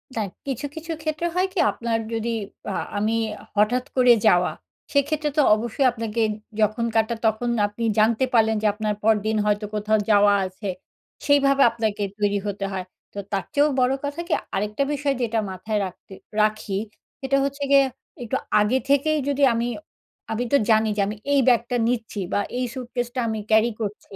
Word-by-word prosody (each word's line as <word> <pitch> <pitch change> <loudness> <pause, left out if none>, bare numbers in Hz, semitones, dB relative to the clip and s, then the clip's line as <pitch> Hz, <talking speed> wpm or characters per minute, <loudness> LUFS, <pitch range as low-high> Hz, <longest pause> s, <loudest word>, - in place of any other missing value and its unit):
দা - - -1 0.3
কিছু, 270 0 -3
কিছু 325 +1 -6
ক্ষেত্রে 310 +2 -2
হয় 365 +1 +2
কি 380 - -2
আপনার 230 -1 -2
যদি 225 +1 -2 0.4
আ - - -3 0.2
আমি 215 +2 +1 0.4
হঠাৎ 230 +5 +2
করে 250 -2 +6
যাওয়া, 180 -3 +4 0.4
সেক্ষেত্রে 295 +2 +1
তো - - +6
অবশ্যই 235 +5 -1
আপনাকে 230 -1 -3 0.4
যখন 215 +2 +1
কাটা, 225 +1 +2
তখন 220 +2 +1 0.2
আপনি 210 +3 -7 0.2
জানতে 225 +4 +3
পারলেন 220 -1 +4
যে, 215 - +2
আপনার 210 0 -2
পরদিন 220 0 +2
হয়তো 210 0 +1
কোথাও 215 +1 +1
যাওয়া 205 0 +5
আছে। 185 +2 -6 0.6
সেইভাবে 280 -1 +4
আপনাকে 220 -2 -2 0.2
তৈরি 205 -1 +1
হতে 200 0 -3
হয়। 190 -1 -4 0.3
তো 205 - -5
তারচেয়েও 285 +9 +1
বড় 255 +1 +3
কথা 285 +3 -4
কি, - - 0 0.2
আরেকটা 210 +7 -1
বিষয় 285 -1 0
যেটা 230 -1 0
মাথায় 210 +3 -2
রাখতে 185 +1 -11 0.3
রাখি, 215 -2 0 0.4
সেটা 275 0 +1
হচ্ছে 280 +1 -3
গিয়ে, 275 -1 +6 0.4
একটু 230 - -1 0.2
আগে 215 +5 +2
থেকেই 285 +3 +3
যদি 280 0 0
আমি 230 +1 -1 0.6
আমি 230 +3 -1
তো - - +7
জানি 220 0 +4
যে, - - +2
আমি 210 - -4 0.2
এই 280 - +5
ব্যাগটা 240 0 +3
নিচ্ছি 225 -3 -2
বা, - - +2 0.2
এই 250 - 0
স্যুটকেসটা 245 -1 -4
আমি 220 -1 -2
ক্যারি 220 +2 +4
করছি। 205 -1 -6
225 Hz, 170 wpm, -23 LUFS, 210-265 Hz, 0.6 s, তো